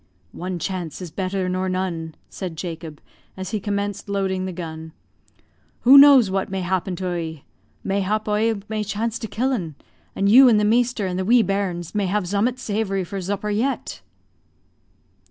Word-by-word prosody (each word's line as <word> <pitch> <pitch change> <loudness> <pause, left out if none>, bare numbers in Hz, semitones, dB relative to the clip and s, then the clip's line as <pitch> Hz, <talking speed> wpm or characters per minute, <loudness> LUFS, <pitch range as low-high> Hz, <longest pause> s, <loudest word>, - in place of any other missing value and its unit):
"One 180 0 -5
chance 175 -2 -4
is 180 -4 -7
better 185 +2 -2
nor 185 +1 -1
none," 175 -4 -3
said 180 -4 -6
Jacob, 160 -3 -6 0.4
as 190 0 -5
he 215 - -1
commenced 205 0 -3
loading 190 -2 -1
the 185 - -3
gun. 160 -2 -7 0.9
"Who 260 +3 +7
knows 275 -7 +8
what 195 0 -1
may 190 -1 -3
happen 185 +1 -1
to 185 - -7
oie? 165 -4 -4 0.4
Mayhap 200 +2 -1
oie 210 0 0
may 215 -1 -2
chance 220 +3 -3
to 225 - -5
kill 250 +6 -1
'un; 170 - -4 0.4
and 200 - +1
you 250 +5 +8
and 215 -3 +4
the 210 - +2
measter 235 -1 +2
and 185 0 -2
the 190 - -1
wee 235 +2 +5
bairns 185 -4 -2
may 205 -2 0
have 205 +2 0
zummut 205 +7 0
zavory 205 -5 -2
for 195 +3 -5
zupper 205 +2 -2
yet." 265 +6 -2
195 Hz, 175 wpm, -22 LUFS, 180-215 Hz, 0.9 s, knows